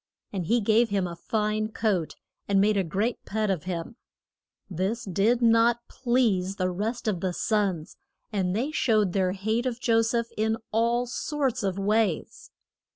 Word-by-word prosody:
And 180 Hz, -5 st, -3 dB
he 235 Hz, +3 st, +3 dB
gave 225 Hz, +3 st, +3 dB
him 200 Hz, -2 st, 0 dB
a 170 Hz, -1 st, -5 dB
fine 215 Hz, +4 st, -1 dB
coat, 210 Hz, -7 st, -1 dB, 0.3 s
and 200 Hz, -1 st, +3 dB
made 210 Hz, +2 st, +3 dB
a 195 Hz, -, +2 dB
great 200 Hz, +8 st, -2 dB
pet 215 Hz, -1 st, -1 dB
of 180 Hz, -5 st, -3 dB
him. 180 Hz, +5 st, -5 dB, 0.7 s
This 195 Hz, +6 st, -2 dB
did 215 Hz, +6 st, +1 dB
not 230 Hz, +1 st, +4 dB
please 225 Hz, -7 st, +1 dB
the 185 Hz, -2 st, -1 dB
rest 220 Hz, +6 st, -3 dB
of 200 Hz, -5 st, 0 dB
the 185 Hz, 0 st, -2 dB
sons, 190 Hz, -6 st, -1 dB, 0.4 s
and 185 Hz, -2 st, 0 dB
they 260 Hz, +8 st, -1 dB
showed 215 Hz, -, +2 dB
their 185 Hz, -2 st, +1 dB
hate 220 Hz, +5 st, -1 dB
of 245 Hz, -1 st, -3 dB
Jo 225 Hz, -2 st, +3 dB
seph 230 Hz, +1 st, -1 dB
in 220 Hz, +1 st, 0 dB
all 235 Hz, +2 st, +2 dB
sorts 270 Hz, +1 st, -2 dB
of 195 Hz, -2 st, -1 dB
ways. 205 Hz, -3 st, 0 dB
215 Hz, 165 wpm, -26 LUFS, 190-230 Hz, 0.7 s, not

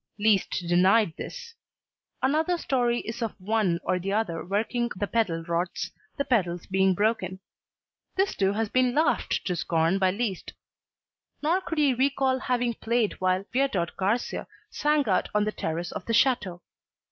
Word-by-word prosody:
Liszt 205 Hz, -3 st, +2 dB
denied 185 Hz, +2 st, +4 dB
this. 475 Hz, -1 st, -8 dB, 0.7 s
Another 315 Hz, +6 st, +2 dB
story 245 Hz, -6 st, 0 dB
is 230 Hz, +2 st, -6 dB
of 225 Hz, -3 st, -3 dB
one 190 Hz, -3 st, +1 dB
or 185 Hz, -, 0 dB
the 195 Hz, +2 st, -3 dB
other 200 Hz, -6 st, -1 dB
working 220 Hz, +5 st, -1 dB
the 205 Hz, -, -1 dB
pedal 195 Hz, -7 st, 0 dB
rods 170 Hz, +1 st, -2 dB, 0.3 s
the 280 Hz, -, 0 dB
pedals 180 Hz, -8 st, 0 dB
being 190 Hz, -1 st, +2 dB
broken. 195 Hz, -3 st, 0 dB, 0.8 s
This 385 Hz, +1 st, +1 dB
too 195 Hz, 0 st, +2 dB
has 220 Hz, +1 st, 0 dB
been 255 Hz, +2 st, +2 dB
laughed 310 Hz, +2 st, +1 dB
to 180 Hz, -, 0 dB
scorn 165 Hz, +3 st, +1 dB
by 190 Hz, -1 st, +3 dB
Liszt. 200 Hz, -1 st, -3 dB, 0.9 s
Nor 340 Hz, +5 st, +2 dB
could 325 Hz, -3 st, -5 dB
he 290 Hz, -3 st, +4 dB
recall 265 Hz, 0 st, +1 dB
having 245 Hz, -2 st, 0 dB
played 230 Hz, -3 st, -1 dB
while 185 Hz, +1 st, +1 dB
Viardot 240 Hz, -11 st, 0 dB
Garcia 205 Hz, +6 st, -1 dB, 0.2 s
sang 295 Hz, -3 st, +1 dB
out 185 Hz, -3 st, +1 dB
on 210 Hz, -, +4 dB
the 215 Hz, -, -1 dB
terrace 170 Hz, -2 st, -3 dB
of 200 Hz, -, -6 dB
the 230 Hz, -, 0 dB
chateau. 205 Hz, -9 st, +2 dB
215 Hz, 160 wpm, -27 LUFS, 185-250 Hz, 0.9 s, denied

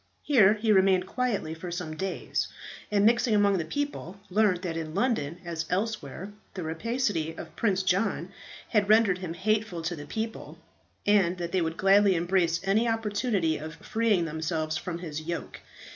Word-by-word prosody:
Here 220 Hz, -8 st, +5 dB
he 215 Hz, 0 st, +1 dB
remained 190 Hz, -2 st, +4 dB
quietly 215 Hz, -8 st, -2 dB
for 165 Hz, +2 st, -7 dB
some 170 Hz, -3 st, -4 dB
days, 190 Hz, +3 st, -2 dB, 0.4 s
and, 205 Hz, -1 st, +3 dB
mixing 235 Hz, 0 st, +4 dB
among 200 Hz, -2 st, +3 dB
the 165 Hz, -, -2 dB
people, 205 Hz, -, -4 dB
learnt 200 Hz, -3 st, +2 dB
that 170 Hz, -3 st, -3 dB
in 160 Hz, -1 st, -5 dB
London 190 Hz, -, 0 dB
as 165 Hz, -2 st, -4 dB
elsewhere 195 Hz, -2 st, -3 dB, 0.2 s
the 185 Hz, -, -4 dB
rapacity 165 Hz, -1 st, -1 dB
of -, -, -9 dB
Prince 195 Hz, -4 st, +1 dB
John 190 Hz, +4 st, 0 dB, 0.4 s
had 210 Hz, -3 st, +2 dB
rendered 215 Hz, -4 st, +5 dB
him 175 Hz, -3 st, -5 dB
hateful 210 Hz, -2 st, -1 dB
to 170 Hz, +2 st, -2 dB
the 145 Hz, -2 st, -9 dB
people, 220 Hz, +6 st, -5 dB, 0.5 s
and 190 Hz, -4 st, +3 dB
that 170 Hz, -1 st, -4 dB
they 185 Hz, -, +1 dB
would 165 Hz, 0 st, -2 dB
gladly 195 Hz, 0 st, +5 dB
embrace 170 Hz, -1 st, +1 dB
any 205 Hz, +5 st, +2 dB
opportunity 210 Hz, -6 st, 0 dB
of 155 Hz, +1 st, -7 dB
freeing 220 Hz, -5 st, +1 dB
themselves 160 Hz, 0 st, -2 dB
from 170 Hz, +2 st, -4 dB
his 155 Hz, -3 st, -5 dB
yoke. 170 Hz, +2 st, -5 dB
190 Hz, 165 wpm, -28 LUFS, 165-215 Hz, 0.5 s, Here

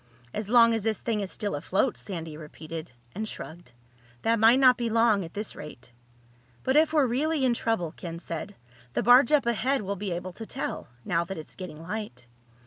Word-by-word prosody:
"As 210 Hz, -1 st, -4 dB
long 230 Hz, -1 st, +6 dB
as 225 Hz, -, 0 dB
this 220 Hz, 0 st, -1 dB
thing 225 Hz, -3 st, -1 dB
is 195 Hz, -2 st, -4 dB
still 205 Hz, -5 st, -3 dB
afloat," 185 Hz, -, 0 dB
Sandy 165 Hz, -5 st, -6 dB
repeated, 155 Hz, +1 st, -8 dB, 0.2 s
and 215 Hz, +2 st, -4 dB
shrugged. 165 Hz, -5 st, -9 dB, 0.5 s
"That 230 Hz, 0 st, +2 dB
might 225 Hz, +3 st, +7 dB
not 255 Hz, -2 st, +7 dB
be 235 Hz, -1 st, -2 dB
long 225 Hz, -3 st, +3 dB
at 165 Hz, -, -10 dB
this 210 Hz, +1 st, -4 dB
rate." 150 Hz, -5 st, -10 dB, 0.7 s
"But 265 Hz, -, +1 dB
if 310 Hz, +1 st, +5 dB
we're 300 Hz, -3 st, +4 dB
really 275 Hz, +4 st, +1 dB
in 250 Hz, -, +3 dB
trouble," 225 Hz, -9 st, -1 dB
Ken 170 Hz, -1 st, -6 dB
said, 170 Hz, +3 st, -6 dB, 0.4 s
"the -, -, 0 dB
barge 245 Hz, +3 st, +7 dB
up 295 Hz, -4 st, +4 dB
ahead 240 Hz, +2 st, +1 dB
will 200 Hz, +1 st, -2 dB
be 195 Hz, 0 st, -4 dB
able 175 Hz, +1 st, -4 dB
to 225 Hz, -, -8 dB
tell—now 165 Hz, -, -3 dB
that 190 Hz, +1 st, -6 dB
it's 155 Hz, -, -9 dB
getting 180 Hz, -5 st, -8 dB
light." 165 Hz, -, -6 dB
210 Hz, 195 wpm, -27 LUFS, 170-235 Hz, 0.7 s, might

